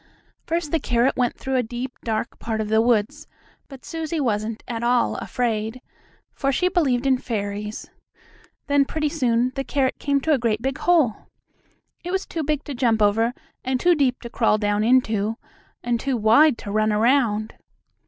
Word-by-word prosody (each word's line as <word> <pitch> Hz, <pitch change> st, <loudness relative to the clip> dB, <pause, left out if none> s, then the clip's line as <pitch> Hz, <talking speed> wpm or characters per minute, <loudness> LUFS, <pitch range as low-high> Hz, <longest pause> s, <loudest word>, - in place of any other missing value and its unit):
First 330 Hz, -3 st, -2 dB
the 325 Hz, -, +2 dB
carrot 240 Hz, 0 st, +1 dB
went 245 Hz, -2 st, 0 dB
through 265 Hz, 0 st, -2 dB
a -, -, +3 dB
deep, 245 Hz, +2 st, -5 dB
dark 220 Hz, 0 st, -3 dB
part 225 Hz, -1 st, -3 dB
of 215 Hz, -1 st, -2 dB
the 220 Hz, +1 st, +4 dB
woods, 235 Hz, +6 st, 0 dB, 0.4 s
but 270 Hz, -2 st, -12 dB
Susie 325 Hz, -1 st, -3 dB
wasn't 220 Hz, -4 st, -2 dB
at 230 Hz, -3 st, -4 dB
all 240 Hz, 0 st, +2 dB
afraid, 225 Hz, -1 st, -2 dB, 0.5 s
for 275 Hz, -, 0 dB
she 360 Hz, +7 st, +1 dB
believed 275 Hz, -9 st, +1 dB
in 260 Hz, -2 st, +3 dB
fairies. 210 Hz, -2 st, -4 dB, 0.8 s
Then, 285 Hz, -1 st, +3 dB
pretty 305 Hz, +1 st, -1 dB
soon, 250 Hz, -5 st, +1 dB
the 270 Hz, 0 st, -3 dB
carrot 270 Hz, -1 st, -1 dB
came 280 Hz, -1 st, +1 dB
to 315 Hz, +2 st, +2 dB
a 275 Hz, -, +2 dB
great 225 Hz, -2 st, 0 dB
big 265 Hz, +3 st, -3 dB
hole. 315 Hz, -11 st, +2 dB, 0.8 s
It 350 Hz, -, -5 dB
was 380 Hz, +1 st, -1 dB
too 325 Hz, -, -4 dB
big 300 Hz, -1 st, -1 dB
to 290 Hz, -, -6 dB
jump 240 Hz, -3 st, +1 dB
over, 220 Hz, +3 st, +3 dB, 0.3 s
and 260 Hz, 0 st, -1 dB
too 355 Hz, +5 st, +4 dB
deep 270 Hz, -5 st, +1 dB
to 235 Hz, -, -7 dB
crawl 225 Hz, -3 st, +2 dB
down 205 Hz, 0 st, 0 dB
into, 225 Hz, -3 st, +2 dB, 0.5 s
and 240 Hz, -1 st, 0 dB
too 265 Hz, +1 st, -1 dB
wide 230 Hz, +6 st, +5 dB
to 200 Hz, -, -7 dB
run 215 Hz, +1 st, +2 dB
around. 220 Hz, -1 st, +2 dB
245 Hz, 180 wpm, -23 LUFS, 220-280 Hz, 0.8 s, wide